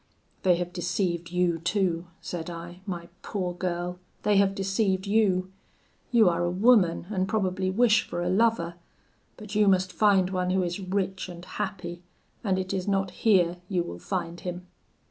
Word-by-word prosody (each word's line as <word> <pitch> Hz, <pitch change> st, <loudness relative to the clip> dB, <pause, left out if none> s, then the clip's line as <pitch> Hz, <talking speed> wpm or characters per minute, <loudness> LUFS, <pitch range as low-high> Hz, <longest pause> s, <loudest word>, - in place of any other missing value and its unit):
'They 180 Hz, -2 st, +4 dB
have 175 Hz, 0 st, -4 dB
deceived 175 Hz, -1 st, -1 dB
you 175 Hz, -1 st, +1 dB
too,' 175 Hz, -1 st, 0 dB
said 170 Hz, -1 st, -5 dB
I, 175 Hz, +1 st, -8 dB
'my 170 Hz, -3 st, -4 dB
poor 185 Hz, -4 st, -3 dB
girl 180 Hz, 0 st, -3 dB, 0.2 s
they 210 Hz, -1 st, +3 dB
have 195 Hz, 0 st, +3 dB
deceived 195 Hz, 0 st, 0 dB
you; 195 Hz, -3 st, +2 dB, 0.6 s
you 230 Hz, -4 st, +5 dB
are 175 Hz, 0 st, +2 dB
a 175 Hz, -, +1 dB
woman, 190 Hz, -3 st, +4 dB
and 190 Hz, -2 st, 0 dB
probably 190 Hz, -3 st, 0 dB
wish 215 Hz, +2 st, +3 dB
for 175 Hz, -, -3 dB
a -, -, -1 dB
lover; 195 Hz, -5 st, +2 dB, 0.6 s
but 210 Hz, -1 st, -9 dB
you 210 Hz, -1 st, +4 dB
must 185 Hz, -1 st, +3 dB
find 195 Hz, -3 st, +3 dB
one 180 Hz, -1 st, 0 dB
who 185 Hz, 0 st, +2 dB
is 175 Hz, +2 st, -3 dB
rich 190 Hz, 0 st, -2 dB
and 175 Hz, 0 st, -9 dB
happy, 180 Hz, -4 st, -5 dB, 0.4 s
and 195 Hz, -4 st, +1 dB
it 185 Hz, +1 st, -2 dB
is 185 Hz, -1 st, -2 dB
not 195 Hz, -2 st, +1 dB
here 180 Hz, -4 st, +3 dB
you 180 Hz, -3 st, +1 dB
will 85 Hz, -, -7 dB
find 175 Hz, -, -3 dB
him. 180 Hz, +1 st, -6 dB
185 Hz, 170 wpm, -27 LUFS, 175-195 Hz, 0.6 s, you